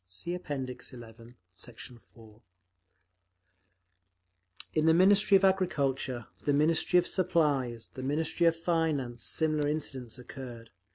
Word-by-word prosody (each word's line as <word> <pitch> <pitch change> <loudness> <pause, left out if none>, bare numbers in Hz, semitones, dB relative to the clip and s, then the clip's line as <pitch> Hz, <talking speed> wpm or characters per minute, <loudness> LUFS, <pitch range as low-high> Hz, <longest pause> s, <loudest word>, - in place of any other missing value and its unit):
(See 90 - -4
App. 180 0 -7
XI, 130 -3 -5 0.5
Sect. 115 +4 -10
4) 115 -3 -12 2.3
In 155 0 +1
the 160 - +6
Ministry 195 +2 +6
of 195 - +2
Agriculture, 135 -10 0 0.2
the 145 - +1
Ministry 160 +4 +3
of 175 - +4
Supplies, 150 - 0
the 130 - -7
Ministry 150 +5 +1
of 165 - +3
Finance, 160 -8 -1
similar 155 -2 0
incidents 135 -6 -4
occurred. 125 -2 -10
145 Hz, 115 wpm, -30 LUFS, 125-165 Hz, 2.3 s, the